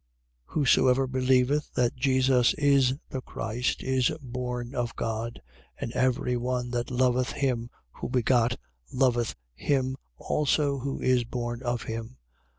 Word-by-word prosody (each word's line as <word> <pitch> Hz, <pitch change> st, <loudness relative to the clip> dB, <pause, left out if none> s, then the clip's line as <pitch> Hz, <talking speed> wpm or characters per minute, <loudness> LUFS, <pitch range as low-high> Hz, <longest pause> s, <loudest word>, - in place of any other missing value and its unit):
5:1. -, -, -20 dB
Whosoever 135 Hz, -2 st, +4 dB
believeth 130 Hz, +2 st, +2 dB
that 120 Hz, -1 st, +1 dB
Jesus 130 Hz, -1 st, +3 dB
is 140 Hz, -3 st, +3 dB, 0.2 s
the 130 Hz, -, -3 dB
Christ, 120 Hz, +1 st, -3 dB
is 130 Hz, -1 st, +2 dB
born 125 Hz, -1 st, -4 dB
of 120 Hz, -3 st, -2 dB
God. 115 Hz, -, -3 dB, 0.4 s
And 115 Hz, -, -4 dB
every 125 Hz, 0 st, +1 dB
one 125 Hz, 0 st, -2 dB
that 120 Hz, -1 st, -2 dB
loveth 125 Hz, 0 st, +1 dB
him 120 Hz, -4 st, -1 dB, 0.2 s
who -, -, -6 dB
begot, 120 Hz, -1 st, +2 dB, 0.3 s
loveth 120 Hz, -3 st, +1 dB, 0.2 s
him 130 Hz, -, 0 dB, 0.2 s
also 145 Hz, -1 st, +1 dB
who 135 Hz, +1 st, -3 dB
is 125 Hz, -1 st, +3 dB
born 120 Hz, 0 st, -4 dB
of 120 Hz, -2 st, -2 dB
him. 115 Hz, +2 st, -6 dB
125 Hz, 135 wpm, -27 LUFS, 120-130 Hz, 0.4 s, Whosoever